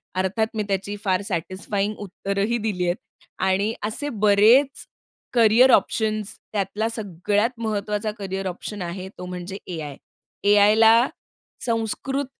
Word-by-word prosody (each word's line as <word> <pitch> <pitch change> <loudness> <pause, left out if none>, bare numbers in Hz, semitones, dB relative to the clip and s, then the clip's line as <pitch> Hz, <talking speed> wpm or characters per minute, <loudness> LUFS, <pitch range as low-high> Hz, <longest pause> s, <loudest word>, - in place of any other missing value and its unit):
अर्थात 190 +4 0
मी 215 - 0
त्याची 200 +1 -2
फार 185 -1 +1
सॅटिस्फाइंग 195 +4 -2
उत्तरही 200 +3 -2
दिली 205 -5 -2
आहेत 175 +1 +1 0.5
आणि 195 +3 +1
असे 265 +7 -3
बरेच 220 +6 +4 0.5
करियर 235 +2 +6
ऑप्शन्स 215 -2 +1 0.2
त्यातला 205 +2 -1
सगळ्यात 210 +3 -1
महत्वाचा 210 -1 -2
करियर 195 -1 -4
ऑप्शन 190 +2 -6
आहे 185 +2 -5
तो 180 - -7
म्हणजे 180 +1 -6
ए-आय. 155 -6 -5 0.5
ए-आयला 220 +4 +6 0.6
संस्कृत 235 +5 -1
205 Hz, 115 wpm, -23 LUFS, 190-220 Hz, 0.6 s, करियर